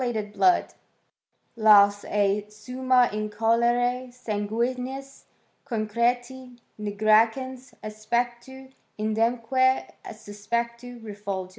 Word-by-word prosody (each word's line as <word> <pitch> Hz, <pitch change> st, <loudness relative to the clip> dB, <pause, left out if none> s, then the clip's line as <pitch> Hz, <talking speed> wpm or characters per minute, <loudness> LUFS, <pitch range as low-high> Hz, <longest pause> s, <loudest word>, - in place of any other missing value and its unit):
ed 215 Hz, -4 st, -3 dB
blood 360 Hz, -, +2 dB, 0.3 s
— -, -, -50 dB
" -, -, -45 dB
laus 205 Hz, -1 st, +6 dB
ei 205 Hz, 0 st, 0 dB
summa 250 Hz, +3 st, +1 dB
in 215 Hz, 0 st, -3 dB
colore 240 Hz, +3 st, +1 dB
sanguinis 250 Hz, +4 st, -4 dB, 0.4 s
con 225 Hz, -6 st, -3 dB
creti, 245 Hz, +3 st, -2 dB, 0.2 s
nigricans 225 Hz, +5 st, +1 dB
aspectu, 240 Hz, +5 st, -4 dB, 0.2 s
idemque 230 Hz, +4 st, +1 dB, 0.2 s
suspectu 235 Hz, +4 st, -5 dB
reful 200 Hz, -3 st, -5 dB
gens." -, -, -21 dB
235 Hz, 95 wpm, -25 LUFS, 215-250 Hz, 0.4 s, laus